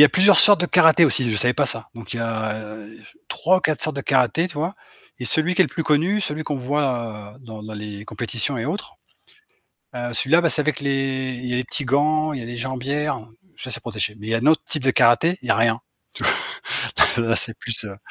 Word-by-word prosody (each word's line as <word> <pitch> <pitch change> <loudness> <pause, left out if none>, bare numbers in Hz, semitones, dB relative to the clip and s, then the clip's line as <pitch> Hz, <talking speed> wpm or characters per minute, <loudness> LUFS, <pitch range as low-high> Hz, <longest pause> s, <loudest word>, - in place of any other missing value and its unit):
y 150 - +11
a - - +6
plusieurs 195 +3 +5
sortes 205 -3 +8
de 175 - +1
karaté 170 -2 +5
aussi, 130 -4 +2
je 105 - 0
savais 125 +4 +3
pas 145 - +1
ça, 115 -2 -1
donc 115 -4 -9
il - - -5
y - - -5
a 110 -1 -3 0.7
3 185 +3 +1
ou - - -7
4 155 -3 -1
sortes 155 -2 -2
de - - -2
karaté, 135 - +1
tu 165 - -10
vois? 165 +6 -3 0.4
Et 125 - -6
celui 160 +7 +1
qui 190 - +4
est - - +1
le - - -5
plus 165 - -5
connu, 170 +8 +1
celui 155 -4 -3
qu'on 145 -2 -4
voit, 120 -6 -3
heu, - - -20
dans 110 -2 -10
dans 110 0 -9
les 105 0 -8
compétitions 120 +3 -3
et 115 - -4
autres, 180 +8 -5 1.0
heu, 120 0 -5
celui-là 145 +9 +2
bah, 170 - +1
c'est 150 - +4
avec 150 -1 -1
les 135 -2 -2
il 125 - -7
y 125 - -3
a - - 0
les 125 - -2
petits 145 +3 0
gants, 155 +4 0
il 135 - -5
y - - -7
a - - -8
les 120 0 -7
jambières, 135 +4 -3 0.4
ça 130 - -7
c'est - - -2
protégé, 110 -2 -1
mais 105 - -10
il - - -4
y 115 - +1
a - - +2
un 125 - -3
autre 155 0 +3
type 150 - 0
de 130 - +3
karaté, 125 +9 +3
il - - -8
y - - +2
a - - +3
rien. 115 0 +1 0.3
Tu - - -6
v - - +4 0.9
là 115 - -1
là 115 - +2
c'est 115 - +2
plus, 115 -2 +2
heu 100 -2 -9
130 Hz, 265 wpm, -21 LUFS, 115-155 Hz, 1.0 s, y